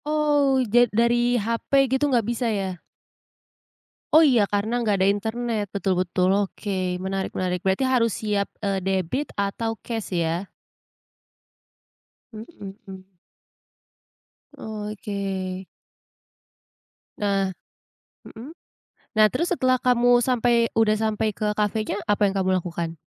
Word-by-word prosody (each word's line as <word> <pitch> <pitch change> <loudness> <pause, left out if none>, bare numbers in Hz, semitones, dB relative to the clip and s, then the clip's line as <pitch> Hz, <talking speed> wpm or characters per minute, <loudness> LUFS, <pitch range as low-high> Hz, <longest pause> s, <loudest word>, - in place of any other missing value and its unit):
Oh 295 -3 +2 0.2
ja 240 -1 +5
dari 240 +2 +2
hape 230 +5 +1
gitu, 265 +3 0
nggak 240 -5 +2
bisa 235 +1 -1
ya? 190 -5 -3 1.3
Oh 310 - +9
iya 240 -6 +4
karena 215 +4 -1
nggak 210 -3 +2
ada 190 - +3
internet, 220 +2 -1
betul 195 -2 -1
betul 180 0 0 0.2
oke, 185 -2 -3
menarik 190 +1 -3
menarik, 180 -1 -2
berarti 195 +8 +1
harus 240 -3 +2
siap, 205 -2 -1
eee, 195 -3 -2
debit 190 - -1
atau 220 +3 -2
cash 225 -4 -5
ya? 170 0 -1 1.9
Mhm. 200 - -10 1.5
Oh, 210 -1 -6
oke. 195 -2 -4 1.5
Nah 195 -2 0 0.8
mhm? 240 +6 -10 0.7
Nah 215 0 +7
terus 340 - -1
setelah 255 -7 +2
kamu 245 -1 +4
sampai 240 -2 +2
udah 215 -1 +4
sampai 215 -1 -1
ke 210 +1 -1
kafenya, 210 -1 -1
apa 205 0 +1
yang 195 - -3
kamu 185 -1 +1
lakukan? 170 -1 -5
215 Hz, 115 wpm, -24 LUFS, 195-240 Hz, 1.9 s, Oh